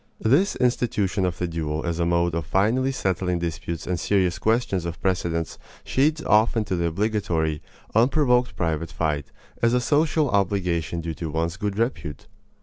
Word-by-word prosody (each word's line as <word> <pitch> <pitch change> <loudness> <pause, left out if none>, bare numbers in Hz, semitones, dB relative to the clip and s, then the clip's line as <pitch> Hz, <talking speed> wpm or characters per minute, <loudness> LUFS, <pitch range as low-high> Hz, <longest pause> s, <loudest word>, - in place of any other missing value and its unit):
This 145 - +3
institution 105 -6 +1
of 90 0 -3
the 90 - -1
duel 80 -2 -3
as 85 -1 -2
a 85 - +1
mode 85 0 +1
of 80 -3 -3
finally 115 - +2
settling 95 -7 -1
disputes 85 -1 -4
and 90 -2 -2
serious 90 -2 +1
questions 110 -4 +1
of 85 -4 -5
precedence 85 -2 -1 0.2
shades 155 +4 +1
off 110 +2 +3
into 105 -4 0
the 85 -1 0
obligatory, 85 -5 -1 0.3
unprovoked 125 +1 +3
private 80 -1 -2
fight, 75 -3 -1 0.3
as 115 +1 +3
a - - +3
social 150 +3 +2
obligation 90 -5 0
due 80 0 -4
to 80 +1 -5
one's 80 +2 -1
good 100 0 -3
repute. 90 - -2
90 Hz, 160 wpm, -24 LUFS, 85-115 Hz, 0.3 s, This